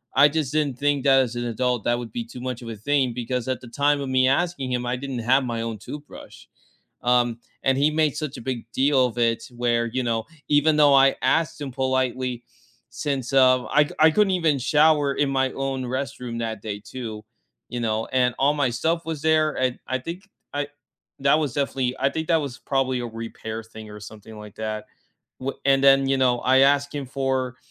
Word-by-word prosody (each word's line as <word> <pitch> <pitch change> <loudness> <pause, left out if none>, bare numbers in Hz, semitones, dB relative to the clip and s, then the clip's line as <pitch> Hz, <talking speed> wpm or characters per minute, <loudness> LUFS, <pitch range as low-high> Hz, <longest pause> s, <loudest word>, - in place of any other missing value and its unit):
I 140 +2 +7
just 150 -3 -2
didn't 145 -5 0
think 145 -1 +1
that 135 -1 +6
as 120 -2 -2
an 120 - -2
adult 120 0 -1
that 120 0 +2
would 120 -3 -7
be 115 0 -4
too 120 +2 -10
much 125 -1 -4
of 120 - -9
a 115 - -5
thing 130 +3 0
because 125 +1 -3
at 130 - -2
the 125 - -11
time 145 +3 +1
of 135 - -4
me 130 0 +3
asking 140 -2 0
him, 125 0 -1
I 120 +1 -1
didn't 135 -2 -5
have 130 +4 +3
my 115 -1 -3
own 115 -1 -4
toothbrush. 145 +7 -10 0.6
Um, 120 -1 +2 0.3
and 135 0 +3
he 145 +2 +3
made 155 -2 +1
such 150 -3 -4
a - - -8
big 125 -2 -4
deal 135 -1 +3
of 120 -1 -6
it 115 -1 +1
where, 120 -1 +1
you 130 +3 -2
know, 115 -2 -1 0.2
even 150 +1 +3
though 145 -2 +6
I 135 0 +5
asked 155 +4 +1
him 135 -3 -5
politely 130 -2 -1 0.5
since, 130 +1 -3
um, 130 -1 +4
I 150 0 +5
c 155 +1 +3
couldn't 210 +1 +3
even 160 -6 +2
shower 150 +1 +3
in 145 0 +1
my 135 -1 +1
own 135 -1 -3
restroom 125 -2 -4
that 110 -3 -4
day 105 -2 -5
too, 110 -3 -7 0.4
you 120 - -4
know, 110 -1 -1
and 125 -1 +2
all 140 +2 +3
my 140 -4 +1
stuff 165 +8 -1
was 160 -3 -4
there, 155 -1 +2
and 130 -1 0
I 130 - 0
think 175 +9 -8 0.3
I 145 0 -2 0.5
that 140 +2 +4
was 150 -6 -2
definitely 135 -3 -1
I 135 +1 +2
think 160 +2 -4
that 165 - +4
was 140 -4 -6
probably 130 -2 -1
a 120 - -3
repair 115 -1 -6
thing 110 -1 -12
or 105 0 -10
something 110 +1 -11
like 105 -1 -11
that 110 -1 -4 0.5
w 130 +1 -3
and 135 0 +3
then, 135 0 +6
you 135 - +2
know, 125 -2 +3
I 130 +1 +4
asked 140 +1 +3
him 145 -1 -3
for 130 -1 -2
130 Hz, 215 wpm, -24 LUFS, 120-145 Hz, 0.6 s, I